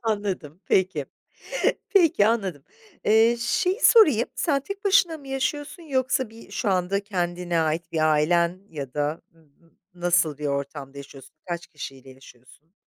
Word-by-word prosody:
Anladım, 200 -8 -3
peki. 180 -7 +1 0.8
Peki, 330 - +4
anladım. 195 -11 -1 0.4
Eee, 225 +2 +4
şeyi 365 - 0
sorayım, 300 - +6
sen 285 -5 +1
tek 395 +6 -8
başına 380 -5 +3
mı 275 -2 -13
yaşıyorsun 285 +5 -3
yoksa 260 -5 0
bir 225 +1 -14
şu 215 - -1
anda 185 +1 +1
kendine 175 -3 -1
ait 160 +1 -2
bir 155 -1 +2
ailen 170 +4 +2
ya 140 -5 -7
da 150 +2 -2 0.7
nasıl 175 -4 +1
bir 150 - -3
ortamda 140 0 -4
yaşıyorsun, 140 -1 -13
kaç 175 -1 -4
kişiyle 135 -3 -10
yaşıyorsun? 130 +5 -18
180 Hz, 135 wpm, -24 LUFS, 150-245 Hz, 0.8 s, sorayım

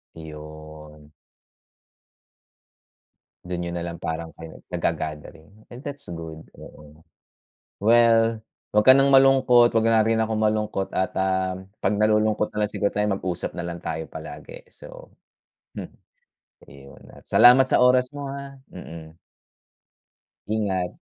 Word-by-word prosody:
Iyon. 75 -1 -12 2.4
Dun 90 -1 -4
niyo 85 - -4
na 85 0 -4
lang 85 0 -7
parang 80 -1 -5
kayo 80 -1 -11
naga-gathering, 80 +1 -4 0.2
and 120 - -9
that's 145 - -8
good. 80 -1 -8 0.2
Oo. 75 +1 -15 0.8
Well, 115 0 +3 0.3
wag 105 - +4
ka 130 - +9
ng 135 +1 +4
malungkot, 135 -3 +5
wag 115 0 +2
na 110 -1 +4
rin 115 0 +1
akong 110 0 -1
malungkot 105 -3 -1
at, 95 -1 -1
ah, 95 -1 0 0.2
pag 105 - 0
nalulungkot 105 0 +1
na 105 0 -1
lang 105 - -3
siguro 100 - -1
tayo 105 0 0
mag-usap 95 -3 -3
na 85 - -4
lang 85 0 -6
tayo 80 0 -4
palagi. - - -11
So, - - -13 0.7
hmm, - - -8 0.8
iyon 70 -1 -15 0.2
salamat 125 +2 +6
sa 130 - +2
oras 125 +1 +3
mo, 140 -1 -6
ah. 140 0 -8 0.2
Mm. 80 -2 -11 1.3
Ingat. 100 -4 -1
105 Hz, 130 wpm, -23 LUFS, 80-120 Hz, 2.4 s, ka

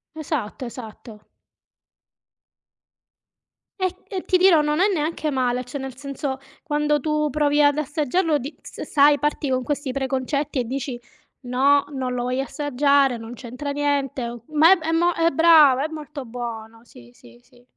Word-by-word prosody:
Esatto, 280 -6 -4
esatto. 220 -2 -11 2.5
E 370 -1 -1
e 380 -3 -5
ti 370 - +3
dirò 360 -4 +5
non 300 +1 0
è 390 +3 +4
neanche 315 -2 -2
male, 250 -2 0
cioè 250 +3 -7
nel 265 -2 -7
senso 275 0 -5 0.2
quando 295 -1 0
tu 305 +1 0
provi 295 +1 +2
ad 290 0 +4
assaggiarlo 305 +2 0
di 280 +4 -8
s - - -11
sai 290 0 +4
parti 295 0 -1
con 255 0 +1
questi 285 +1 -3
preconcetti 270 +2 -2
e - - +1
dici: 255 0 -4 0.4
"No, 270 +3 +2
non 260 -2 -3
lo 245 - -2
voglio 250 +2 -1
assaggiare, 280 -2 +1
non 225 +1 -9
c'entra 255 +4 -7
niente, 280 -3 -1
o" 235 -1 -9
ma 330 +5 +7
è 320 0 -3
mo 345 +2 +2
eh 330 0 +2
brava, 305 -4 +5
è - - -4
molto 300 -3 -8
buono. 230 -1 -7
Sì, 120 - -16
sì, 120 -1 -18
sì. 245 - -24
280 Hz, 160 wpm, -22 LUFS, 250-300 Hz, 2.5 s, ma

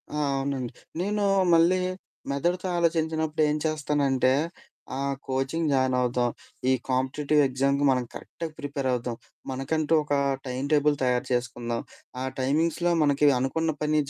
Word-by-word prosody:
ఆ! 150 - -5 0.2
అవునండి. 135 -3 -2 0.3
నేను 205 +2 0 0.3
మళ్ళీ 170 +3 +5 0.5
మెదడుతో 175 +7 0
ఆలోచించినప్పుడు 160 -2 0
ఏం 150 - +1
చేస్తానంటే, 145 -4 +1 0.7
ఆహ్, 140 0 -1
కోచింగ్ 135 +5 -1
జాయినవుదాం. 125 -2 +2 0.4
ఈ - - +5 0.2
కాంపిటీటివ్ 135 +3 +2
ఎగ్జామ్‌కి 135 +2 +1
మనం 130 -1 +2
కరెక్ట్‌గా 165 - -7
ప్రిపేరవుదాం, 130 -4 -2 0.4
మనకంటూ 150 +4 -1
ఒక 145 - -2 0.3
టైమ్ 130 +2 -3
టేబుల్ 150 -1 +4
తయారు 125 -1 +1
చేసుకుందాం, 120 -1 -2 0.4
ఆ - - -1 0.2
టైమింగ్స్‌లో 160 +6 +1
మనకి 145 0 +3
అనుకున్న 160 +6 0
పని 155 0 +2
140 Hz, 120 wpm, -26 LUFS, 130-155 Hz, 0.7 s, మళ్ళీ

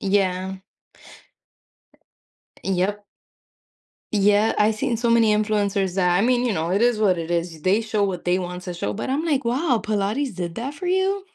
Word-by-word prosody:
Yeah. 190 -1 0 2.1
Yep. 195 +2 -1 1.1
Yeah, 205 +1 +3
I've 215 +1 +3
seen 230 +2 -1
so 235 +1 0
many 225 -2 +4
influencers 205 -3 0
that 180 -2 +2
I - - +2
mean, 245 +2 +2
you 235 - +1
know, 165 -1 -2
it 195 +3 +1
is 240 -1 +3
what 200 -4 +2
it 165 0 -5
is. 170 -2 -2
They 195 +7 +2
show 220 -2 -1
what 185 -3 -4
they 180 +1 +1
want 180 0 -5
to 180 -1 -5
show, 105 -12 -3
but 105 - -4
I'm 290 +5 -1
like, 285 -5 +1
"Wow, 250 +1 +1
Pilates 215 +6 -1
did 175 -2 -5
that 260 +5 -4
for 355 +5 -5
you?" 380 +2 0
205 Hz, 180 wpm, -23 LUFS, 185-235 Hz, 2.1 s, many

